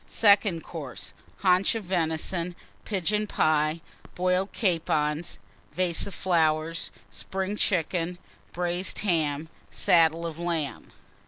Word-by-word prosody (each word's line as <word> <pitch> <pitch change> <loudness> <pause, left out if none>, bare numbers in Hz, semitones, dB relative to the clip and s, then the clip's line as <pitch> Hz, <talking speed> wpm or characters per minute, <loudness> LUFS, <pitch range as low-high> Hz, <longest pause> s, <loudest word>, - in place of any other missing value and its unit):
Second 200 -5 +4
Course. 145 -7 -7 0.3
Haunch 185 +3 +4
of 225 - -3
Venison. 170 0 -1 0.3
Pigeon 210 +2 0
Pie. 155 -2 +2 0.3
Boiled 185 +2 +1
Capons. 165 -5 0 0.4
Vase 180 +1 0
of 200 - -8 1.0
Spring 190 - -3
Chickens. 175 -2 0
Flowers. 100 - -29
Braised 175 +1 0
Ham. 155 -4 +1 0.2
Saddle 170 -3 +3
of 165 -1 -5
Lamb. 165 -5 -3
175 Hz, 100 wpm, -27 LUFS, 160-190 Hz, 1.0 s, Second